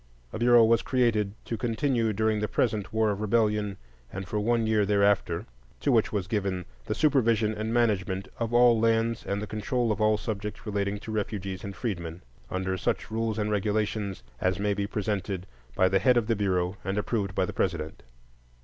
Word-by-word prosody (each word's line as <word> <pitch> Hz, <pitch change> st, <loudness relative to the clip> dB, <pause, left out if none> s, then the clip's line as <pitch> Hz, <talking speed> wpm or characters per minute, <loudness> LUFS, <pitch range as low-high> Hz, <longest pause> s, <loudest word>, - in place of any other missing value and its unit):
A -, -, -4 dB
Bureau 120 Hz, -1 st, +6 dB
was 115 Hz, +1 st, +4 dB
created, 110 Hz, -6 st, +1 dB
"to 115 Hz, -, -3 dB
continue 120 Hz, -1 st, +1 dB
during 110 Hz, +1 st, +1 dB
the 105 Hz, -, -1 dB
present 105 Hz, -6 st, 0 dB
War 110 Hz, -1 st, +2 dB
of 100 Hz, 0 st, -4 dB
Rebellion, 105 Hz, -2 st, +1 dB, 0.3 s
and 95 Hz, 0 st, -6 dB
for 105 Hz, -, -1 dB
one 115 Hz, +2 st, +1 dB
year 110 Hz, -1 st, +3 dB
thereafter," 100 Hz, -2 st, +2 dB, 0.3 s
to 140 Hz, -, +1 dB
which 115 Hz, -2 st, +3 dB
was 100 Hz, -4 st, -1 dB
given 95 Hz, -3 st, -2 dB, 0.2 s
"the -, -, -1 dB
supervision 115 Hz, -7 st, +3 dB
and 110 Hz, +1 st, -3 dB
management 100 Hz, -5 st, +1 dB
of 115 Hz, -1 st, -1 dB
all 120 Hz, -1 st, +5 dB
abandoned 115 Hz, 0 st, +3 dB
lands 115 Hz, -, -6 dB
and 100 Hz, -, -1 dB
the 105 Hz, -, -3 dB
control 115 Hz, +3 st, -1 dB
of 105 Hz, -, -2 dB
all 110 Hz, 0 st, +4 dB
subjects 105 Hz, 0 st, -5 dB
relating 100 Hz, -1 st, -1 dB
to 110 Hz, +2 st, -8 dB
refugees 100 Hz, -3 st, -3 dB
and 100 Hz, -1 st, -6 dB
freedmen," 85 Hz, -7 st, -4 dB, 0.3 s
under 95 Hz, 0 st, -2 dB
"such -, -, -2 dB
rules 110 Hz, -1 st, -1 dB
and 105 Hz, 0 st, -1 dB
regulations 105 Hz, -1 st, -1 dB, 0.2 s
as 90 Hz, 0 st, +1 dB
may 100 Hz, +1 st, 0 dB
be 100 Hz, 0 st, -2 dB
presented 100 Hz, -3 st, -2 dB, 0.3 s
by 95 Hz, -, +4 dB
the 95 Hz, +1 st, +2 dB
head 125 Hz, +1 st, +4 dB
of 120 Hz, -, +2 dB
the 115 Hz, +1 st, +1 dB
Bureau 95 Hz, -2 st, 0 dB
and 95 Hz, +1 st, -2 dB
approved 105 Hz, -3 st, -1 dB
by 95 Hz, -, +2 dB
the -, -, -6 dB
President." 85 Hz, -4 st, -2 dB
105 Hz, 195 wpm, -27 LUFS, 100-115 Hz, 0.3 s, Bureau